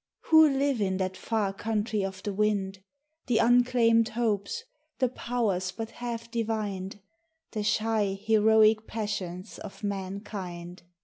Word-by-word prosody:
Who 315 -1 +8
live 275 -3 +1
in 190 -2 0
that 190 0 -2
far 210 -1 -1
country 215 0 -1
of 190 -1 -5
the 205 - -3
wind? 195 -2 0 0.5
The 240 -3 +2
unclaimed 235 -1 +4
hopes, 215 -4 -1 0.3
the 255 -2 +2
powers 220 -7 -1
but 225 +3 -6
half 235 -1 -6
divined, 210 -4 -3 0.5
The 215 - -3
shy, 210 -1 +1
heroic 220 0 +4
passions 190 -5 -4
of 210 +1 -10
mankind. 190 -3 -5
215 Hz, 125 wpm, -28 LUFS, 195-230 Hz, 0.5 s, Who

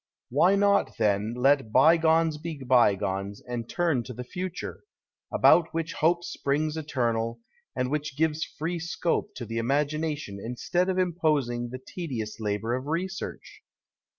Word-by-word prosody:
Why 175 +9 +4
not, 200 0 +2
then, 105 +1 +1
let 135 -2 +3
bygones 160 +3 +4
be 165 -1 -5
bygones 100 -5 +2
and 120 -2 -6
turn 165 -8 +1
to 125 - -7
the 125 - -6
future, 180 +7 -5 0.5
about 165 -2 +4
which 165 0 -2
hope 170 +2 +2
springs 150 0 -1
eternal, 120 -6 -1 0.4
and 125 0 -1
which 150 -2 -2
gives 160 0 +1
free 170 +3 -4
scope 170 0 -2
to 120 - -5
the 115 +1 -3
imagination 145 -2 -1
instead 175 +10 -1
of 185 - 0
imposing 150 -9 0
the 130 +1 -6
tedious 120 -12 -5
labour 110 +2 -1
of 130 +2 -3
research 185 +5 -4
145 Hz, 140 wpm, -27 LUFS, 120-165 Hz, 0.5 s, Why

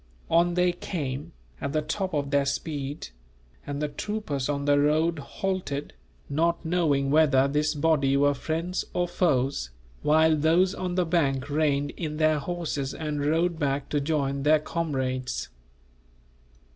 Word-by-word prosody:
On 170 +1 +3
they 180 0 +3
came, 150 -4 -4 0.3
at 140 0 -3
the 155 -1 +1
top 185 +2 -2
of 140 -1 -1
their 140 0 +2
speed; 145 - -3 0.6
and 145 0 -3
the 150 - 0
troopers 150 -5 -3
on 140 -1 -1
the 145 0 +4
road 155 +3 +2
halted, 180 -3 -3 0.3
not 170 +4 0
knowing 150 -5 +1
whether 140 -3 +4
this 150 +2 0
body 145 -3 +2
were 145 +1 +4
friends 165 +6 -2
or 175 0 +1
foes, 135 - 0 0.3
while 160 +1 +4
those 165 +5 +3
on 180 -2 -3
the 180 -1 +2
bank 145 -5 0
reined 145 -1 +1
in 150 -3 -5
their 155 -1 +3
horses, 150 -3 -3
and 150 -2 -3
rode 165 +3 +1
back 140 -2 -1
to 145 - 0
join 140 -2 -1
their 150 +2 +5
comrades. 130 -6 -2
150 Hz, 145 wpm, -26 LUFS, 140-165 Hz, 0.6 s, their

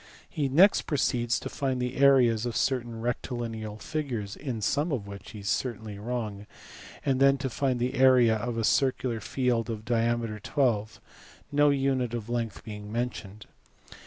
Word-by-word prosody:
He 140 -3 -2
next 180 +9 +5
proceeds 120 -5 +1
to - - -6
find 135 -3 -2
the 125 +1 -2
areas 125 -4 +4
of 120 - -4
certain 120 -4 -1
rectilineal 115 -3 -4
figures 120 -9 -4
(in 130 -6 -4
some 145 +9 0
of 120 -8 -2
which 100 +1 -9
he 110 -2 -9
is 100 - -7
certainly 110 -3 -2
wrong) 105 -3 -4 0.6
and 135 -2 +1
then 135 0 +5
to 135 -1 -3
find 130 0 0
the 125 +1 -1
area 130 -3 +5
of 115 +2 -3
a 115 - 0
circular 130 -1 +1
6eld 120 0 -1
of 110 -1 -5
diameter 115 -2 0
12 110 -4 0 0.5
no 145 0 +4
unit 135 -4 +1
of 115 -1 -6
length. 115 -2 -3
mentioned. 105 -1 -5
120 Hz, 160 wpm, -28 LUFS, 110-130 Hz, 0.6 s, next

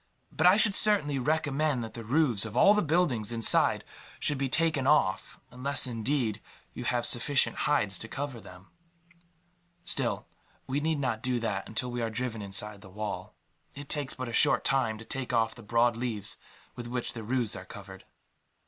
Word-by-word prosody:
But 160 - +3
I 185 +3 +6
should 210 -2 +4
certainly 155 -11 +3
recommend 145 -1 0
that 110 - -8
the 115 - -7
roofs 125 -3 +1
of 110 +1 -5
all 200 - +7
the 210 - +2
buildings 150 - +1
inside 115 -2 +3 0.4
should 145 -3 +1
be 135 -1 -1
taken 155 -3 +1
off 140 -11 +1
unless, 135 +4 +1
indeed, 115 -2 -1 0.3
you - - -7
have 120 -1 0
sufficient 135 +3 +2
hides 105 -11 +1
to 110 - -6
cover 135 -1 -5
them. 90 -1 -15 1.1
Still, - - -2 0.4
we 135 +2 -2
need 155 +1 0
not 120 -5 -2
do 125 -1 -1
that 100 -4 -3
until 125 +3 -4
we 120 0 -3
are 115 - -1
driven 115 -1 -4
inside 100 +1 -2
the 95 - -13
wall. 105 +2 -6 0.4
It 140 0 -9
takes 145 -3 +2
but 130 -1 -5
a 120 - -6
short - - +4
time 120 -5 +1
to 110 - -12
take 130 0 -4
off 115 -1 +1
the 115 - -13
broad 115 +2 +2
leaves 110 -4 -3 0.4
with 120 -1 -7
which 120 0 -3
the 115 - -7
roofs 120 0 0
are - - -8
covered." - - -12
125 Hz, 185 wpm, -28 LUFS, 110-145 Hz, 1.1 s, all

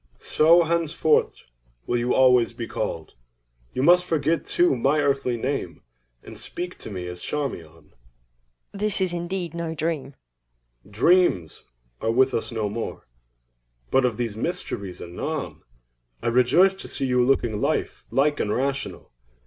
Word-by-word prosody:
CHARMION. - - -15
So 170 +3 +5
henceforward 160 -2 +1 0.5
will 120 - 0
you 120 +1 -1
always 125 -3 +4
be 115 - -5
called. 80 -8 -4 0.6
You 130 - -2
must 175 +3 +6
forget 160 -1 0
too, 175 -5 +3
my 135 +5 +2
earthly 135 -4 0
name, 120 - -3 0.4
and - - -10
speak 180 +1 -6
to - - -7
me 90 -3 -5
as 90 0 -7
Charmion. 80 - -5
EIROS. - - -31 0.8
This 210 0 +2
is 185 -2 +1
indeed 175 -1 -4
no 170 -1 -4
dream! 150 -3 -3 0.8
CHARMION. 175 - +5
Dreams 80 -4 -8 0.4
are - - 0
with 130 +3 +3
us 115 - -2
no 110 -2 -2
more; 110 +3 -5 0.9
but 135 - +4
of 120 -4 0
these 115 -4 -3
mysteries 105 - -4
anon. 140 - -5 0.6
I - - +1
rejoice 125 +11 +4
to - - -9
see 135 - -3
you 125 -1 +2
looking 120 -5 +1
life 150 +3 -1
like 145 +2 +1
and 105 - -1
rational. 135 +4 -3
135 Hz, 150 wpm, -24 LUFS, 115-165 Hz, 0.9 s, must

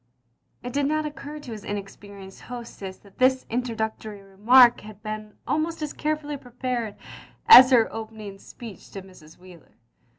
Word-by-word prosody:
" - - -45
It 245 0 -6
did 285 0 +1
not 310 +1 -1
occtir 300 0 -8
to 250 - -9
his 215 -2 -8
inexperienced 200 -1 -9
hostess 230 -6 -9
that 200 -2 -22
this 260 0 +3
introductory 220 -3 -4
remark 235 +6 +5
had 210 0 -13
been 215 -1 -7
almost 315 +1 -2
as 300 - -4
carefully 300 -1 -3
prepared 245 -3 -5 0.5
as 260 - +10
her 235 -4 +4
own 225 - -4
opening 215 -3 -10
speech 225 -1 -12
to 195 - -7
Mrs. 170 -5 -17
Wheler. 180 -2 -17
225 Hz, 160 wpm, -24 LUFS, 200-260 Hz, 0.5 s, as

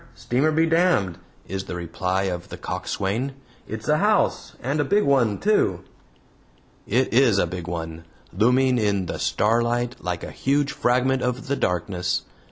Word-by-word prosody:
Steamer 135 +6 +1
be 160 +1 +3
damned!" 165 - +2 0.3
is 95 +1 -4
the - - -5
reply 90 +2 -2
of 90 -2 -3
the - - -7
coxswain. 115 +8 -3 0.3
"It's - - -6
a - - +4
house, - - +1
and 140 +5 -2
a - - +3
big 205 +9 +2
one 125 -7 +3
too." 200 - +2 1.1
It 125 +4 +1
is 120 -4 +5
a 100 - +3
big 90 0 -6
one, 80 -1 -5 0.3
looming 125 +5 +3
in 100 -3 +1
the - - -5
starlight 120 +2 +1
like 90 -2 -3
a - - -6
huge 140 +1 0
fragment 130 +2 +1
of 125 +1 -2
the 140 - 0
darkness. 90 -3 -1
120 Hz, 160 wpm, -24 LUFS, 90-135 Hz, 1.1 s, is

